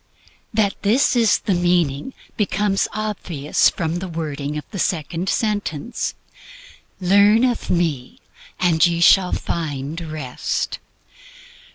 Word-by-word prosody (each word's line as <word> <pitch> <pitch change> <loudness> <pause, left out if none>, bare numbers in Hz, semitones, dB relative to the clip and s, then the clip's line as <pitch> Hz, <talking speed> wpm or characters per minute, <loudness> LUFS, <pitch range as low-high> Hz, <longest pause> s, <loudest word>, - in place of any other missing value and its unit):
That 210 -3 +1
this 230 +6 +3
is 230 -3 +4
the 200 - -1
meaning 175 - +1 0.2
becomes 205 -1 0
obvious 190 -9 0
from 165 0 -3
the 190 - -5
wording 150 -3 -4
of 150 - -5
the 200 - -5
second 170 +2 -1
sentence: 210 -1 -2 0.8
"Learn 200 +5 +5
of 245 -2 0
me, 160 -8 -1 0.4
and 165 -3 +3
ye 170 -1 +3
shall 180 +2 +5
find 150 0 -3
Rest." 140 -5 -3
175 Hz, 110 wpm, -21 LUFS, 155-205 Hz, 0.8 s, Learn